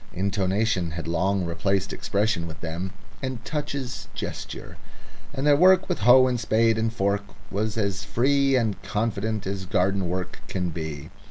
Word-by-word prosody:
Intonation 95 -1 0
had 85 0 -5
long 90 +3 +1
replaced 95 +3 -1
expression 100 -4 0
with 80 0 -9
them, 85 +3 -4 0.3
and 130 -4 -4
touches 145 -3 -4
gesture, - - -6 0.5
and 140 0 -3
their 145 -1 +6
work 185 +4 +6
with - - -1
hoe 125 +4 +7
and 125 -1 0
spade 115 0 +3
and 110 0 +1
fork 100 -2 +1 0.3
was 105 +2 -1
as 100 -2 -1
free 135 +4 +2
and 110 -5 0
confident 110 -1 -1
as 95 -1 -4
garden 95 0 +1
work 90 0 -3
can 90 -2 -2
be. 80 -2 -6
100 Hz, 155 wpm, -25 LUFS, 95-120 Hz, 0.5 s, hoe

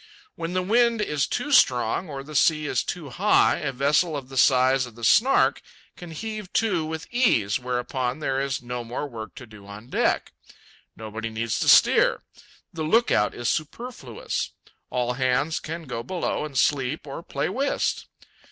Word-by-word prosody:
When 165 +1 -5
the 185 0 0
wind 235 +3 +3
is 150 -9 0
too 295 - -3
strong, 125 - +3
or 135 -2 -6
the 155 +2 -11
sea 150 +2 +3
is - - 0
too 155 -6 -6
high, 205 +9 +3
a 145 -4 -3
vessel 145 +5 +1
of 135 -2 -8
the 135 - -10
size 130 0 +4
of 120 - -14
the 115 - -12
Snark 250 - +4 0.3
can 175 - -10
heave 215 +3 -6
to 195 -8 +1
with 160 +1 -5
ease, 125 - +2
whereupon 125 +1 -2
there 135 -3 -1
is 135 -2 -3
no 125 0 -5
more 120 +5 -4
work 110 -5 -9
to 125 - -10
do 105 -3 -15
on 105 +4 -11
deck. - - 0 0.6
Nobody 110 +1 -6
needs 110 0 -2
to - - -1
steer. - - +5 0.5
The 165 - -5
lookout 155 - +2
is 120 - -3
superfluous. 155 - -3 0.4
All 125 -1 -1
hands 130 +5 0
can 165 +2 -6
go 125 -5 -5
below 170 +3 -3
and 140 -3 -6
sleep 140 +2 +1
or 140 +3 -7
play - - -3
whist. 275 +2 -1
140 Hz, 170 wpm, -24 LUFS, 125-170 Hz, 0.6 s, steer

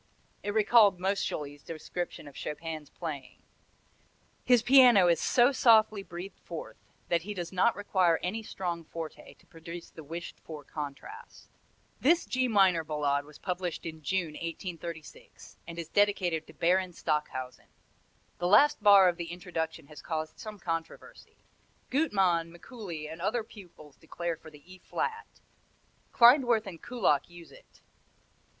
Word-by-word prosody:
It 205 +1 -4
recalled 210 -3 +5
Moscheles' 150 -7 -2
description 165 0 -6
of 145 - -11
Chopin's 155 -1 -6
playing: 145 -6 -7 1.0
"His 245 -2 +4
piano 245 -7 +7
is 170 -2 +3
so 245 +2 +4
softly 220 -5 +4
breathed 185 +1 -9
forth 165 -2 -8 0.3
that 170 -1 +2
he 205 +4 -6
does 175 -2 -5
not 190 +5 +2
require 185 -4 +2
any 205 +5 -2
strong 175 -5 -4
forte 165 0 -8
to - - -26
produce 170 -1 -10
the 160 - -11
wished 165 +4 -7
for 155 -2 -9
contrast." 150 - -9 0.5
This 335 +6 +3
G 255 0 0
minor 190 -7 +4
Ballade 145 -2 -1
was 150 0 -14
published 180 -2 -4
in 160 -1 -7
June, 170 +1 -1
1836, 165 -1 -8
and 170 0 -8
is 170 -2 -5
dedicated 185 -6 +1
to - - -14
Baron 180 +1 +1
Stockhausen. 150 -6 -3 0.7
The 175 - 0
last 255 +7 +5
bar 200 -2 +8
of 175 -1 +1
the 170 -1 -5
introduction 165 -3 -4
has 150 +1 -12
caused 155 -1 -4
some 215 -2 -8
controversy. 165 -3 -6 0.5
Gutmann, 190 - +2
Mikuli 175 - -8
and 160 +2 -9
other 220 +5 0
pupils 175 -9 -15
declare 170 +1 -4
for 160 - -14
the 150 -2 -17
E 185 +1 -14
flat; 450 - -3 0.8
Klindworth 240 -2 +5
and 180 -4 -9
Kullak 230 - 0
use 175 -1 -13
it. - - -19
175 Hz, 145 wpm, -29 LUFS, 160-205 Hz, 1.0 s, bar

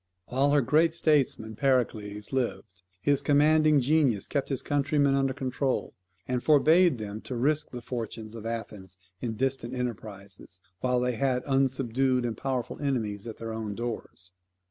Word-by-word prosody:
While 135 +3 +2
her 145 - +5
great 155 +6 +3
statesman 140 -9 +1
Pericles 110 -5 0
lived, 115 -6 -3 0.2
his 140 +6 +2
commanding 150 +1 +4
genius 135 -6 +2
kept 140 -2 -2
his 135 -3 -1
countrymen 145 -1 +2
under 135 -1 +2
control 130 0 -2 0.3
and 125 -1 -1
forbade 155 +2 +5
them 105 0 -6
to 130 - -6
risk 150 +5 +1
the 120 -1 -8
fortunes 115 -2 -5
of 115 -2 -8
Athens 105 -5 -6 0.2
in 115 0 -3
distant 130 0 -1
enterprises, 100 -7 -6 0.2
while 125 +3 +1
they 125 -1 -1
had 130 -1 +1
unsubdued 130 -1 +1
and 115 -2 -2
powerful 130 +1 -3
enemies 115 -7 -2
at 110 - -7
their 115 -1 -5
own 110 -2 -4
doors. 115 -6 -6
125 Hz, 150 wpm, -28 LUFS, 110-140 Hz, 0.3 s, her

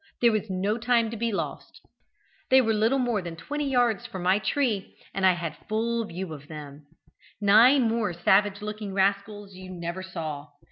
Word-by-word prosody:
There 235 -1 +5
was 215 -1 -2
no 195 +4 -1
time 230 -1 +2
to - - -5
be 230 +1 -1
lost: 200 - -5 0.7
they 265 - +7
were 225 -3 +2
little 220 +5 +2
more 240 -5 0
than 170 -2 -7
twenty 290 - -3
yards 245 -6 +1
from 185 -2 -7
my 185 +3 +3
tree, 215 -1 -1 0.2
and 195 -1 +2
I 185 - +5
had 170 -2 -4
a - - -23
full 230 +1 -1
view 180 -3 -6
of 145 -1 -11
them. 150 -2 -10 0.5
Nine 230 +7 +6
more 225 -3 0
savage 195 +4 +2
looking 210 -2 -5
rascals 200 +1 -1
you 185 0 -10
never 170 0 -5
saw. 160 -6 -6
205 Hz, 185 wpm, -26 LUFS, 185-230 Hz, 0.7 s, they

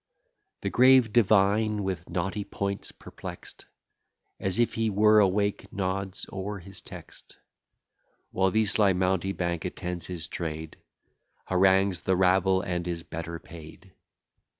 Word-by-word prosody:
The - - -2
grave 130 -3 +5
divine, 105 -1 +3
with 90 -3 -4
knotty 95 +3 -2
points 100 0 -4
perplext, - - -10 0.7
As 95 -1 0
if 120 0 +2
he 115 -1 0
were 105 +1 +5
awake, 100 +1 +1
nods 95 0 -3
o'er 100 +1 -4
his 95 +1 -8
text: - - -11 0.9
While 95 0 +2
the 110 +3 +2
sly 105 -1 +3
mountebank 90 -2 -1
attends 90 -2 -4
his 85 -3 -3
trade, 80 -2 -5 0.7
Harangues 95 0 +3
the 95 +2 +1
rabble, 95 +1 +3
and 90 -2 -3
is 85 -1 -4
better 85 +1 -6
paid. 85 +3 -13
95 Hz, 125 wpm, -27 LUFS, 90-100 Hz, 0.9 s, grave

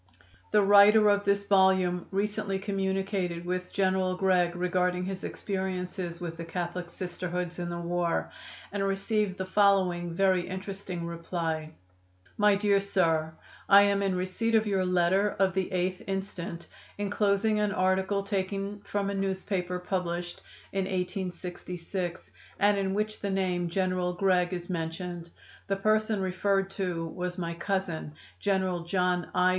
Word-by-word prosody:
The 210 - +4
writer 205 +2 +7
of 205 0 +1
this 200 0 +2
volume 190 -3 +3
recently 200 0 -1
communicated 190 -3 -2
with 180 0 -3
General 185 -1 +1
Gregg 180 -2 +2
regarding 180 0 0
his 190 0 -4
experiences 185 -3 -3
with 165 -2 -5
the 165 - -5
Catholic 175 +1 -4
Sisterhoods 180 0 -4
in 175 0 -3
the 170 - -4
war, 170 0 -1 0.4
and 200 -1 -1
received 195 0 0
the 190 - -3
following 185 -3 +3
very 185 -1 +2
interesting 190 -2 -5
reply: 165 -2 -3 0.6
"My 210 -1 +4
Dear 200 0 +3
Sir: 165 -5 +1 0.3
I 200 0 +9
am 200 0 +2
in 195 -2 +1
receipt 185 +5 0
of 220 0 +4
your 195 -3 +1
letter 180 +3 +2
of 190 -1 +3
the 190 -1 -1
8th 185 0 -1
instant, 190 -3 -4 0.3
inclosing 205 +1 +1
an 210 -1 +1
article 190 +1 +1
taking 195 +1 -2
from 200 -1 -2
a - - -3
newspaper 190 -2 -2
published 175 -1 -3 0.3
in 195 -1 0
1866, 180 -1 -4 0.3
and 205 0 +4
in 195 -1 -1
which 215 +1 -1
the 200 - -3
name 180 -2 0
'General 185 0 0
Gregg' 180 -1 +2
is 175 -1 -4
mentioned. 170 0 -4 0.4
The 195 - +1
person 215 0 +1
referred 195 +1 0
to 180 -4 -2
was 180 +2 -4
my 170 -2 -3
cousin, 170 -4 -3 0.2
General 190 - +1
John 180 -1 0
I. 180 0 +4
185 Hz, 140 wpm, -29 LUFS, 175-195 Hz, 0.6 s, I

